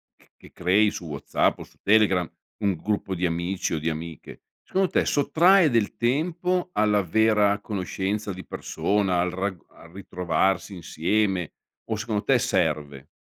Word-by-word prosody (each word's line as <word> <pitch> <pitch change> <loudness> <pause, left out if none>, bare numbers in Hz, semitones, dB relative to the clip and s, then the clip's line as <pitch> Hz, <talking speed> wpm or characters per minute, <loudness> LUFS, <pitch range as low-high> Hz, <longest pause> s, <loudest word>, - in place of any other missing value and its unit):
c - - -28
che - - -17
crei 100 +4 +2
su 90 - -7
WhatsApp 70 -2 0
o - - -7
su - - -21
Telegram, 100 -5 +3 0.3
un 100 -3 +1
gruppo 100 +2 -2
di 90 +1 -1
amici 85 +2 -2
o 80 - -1
di 80 +2 -1
amiche, 80 -1 -7 0.2
secondo 190 -1 0
te - - +1
sottrae 170 +3 +4
del 115 -3 +1
tempo 175 +9 0
alla 105 -1 +2
vera 105 +2 +2
conoscenza 100 +1 -3
di 95 - -9
persona 95 -3 -1
al 90 0 0
rag 95 -1 -3
al 85 - -17
ritrovarsi 95 0 -1
insieme 90 +1 -1 0.4
o 110 - +1
secondo 110 -2 -2
te 130 +3 +3
serve? 75 - -1
100 Hz, 155 wpm, -25 LUFS, 90-110 Hz, 0.4 s, sottrae